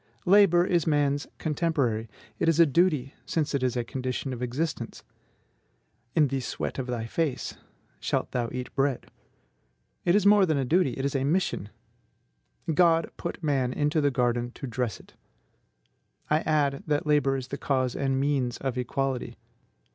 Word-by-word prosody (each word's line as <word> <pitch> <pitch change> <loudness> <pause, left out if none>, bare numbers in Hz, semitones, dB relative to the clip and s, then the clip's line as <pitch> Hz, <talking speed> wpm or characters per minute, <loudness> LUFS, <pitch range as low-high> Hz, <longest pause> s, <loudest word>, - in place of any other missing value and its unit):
Labor 180 -2 +6
is 175 -3 +1
man's 145 -1 +1
contemporary; 140 -8 -1 0.3
it - - +3
is 165 0 +2
a 170 - +8
duty, 150 -3 +2
since 155 -3 -1
it 140 - 0
is 125 -1 0
a 120 - 0
condition 130 +2 -3
of 120 - -7
existence: 125 -1 -3 1.1
"In 150 -3 +5
the 135 0 -1
sweat 125 - -4
of 130 - -3
thy 120 -2 -3
face 135 +2 -2 0.4
shalt - - -1
thou 120 -2 -1
eat 125 0 -5
bread." 135 -2 -1 0.9
It 175 - +3
is 205 -1 +3
more 200 -2 +6
than 155 -3 +1
a 135 - 0
duty, 160 0 +2
it 135 - -3
is 140 - -1
a 135 - +1
mission: 145 - 0 1.0
"God 165 0 +3
put 170 - -5
the - - -5
man 135 -4 +1
into 150 +2 +1
the 145 - +3
garden 120 -2 0
to - - -7
dress 120 -2 -3
it." - - -18 1.2
I 155 - +4
add 145 -3 +1
that 150 0 0
labor 145 -3 +2
is 130 0 -6
the 140 - -5
cause 130 -3 0
and 135 -1 0
means 135 -3 0
of 130 -2 -3
equality. 130 +1 -2
140 Hz, 170 wpm, -27 LUFS, 125-155 Hz, 1.2 s, a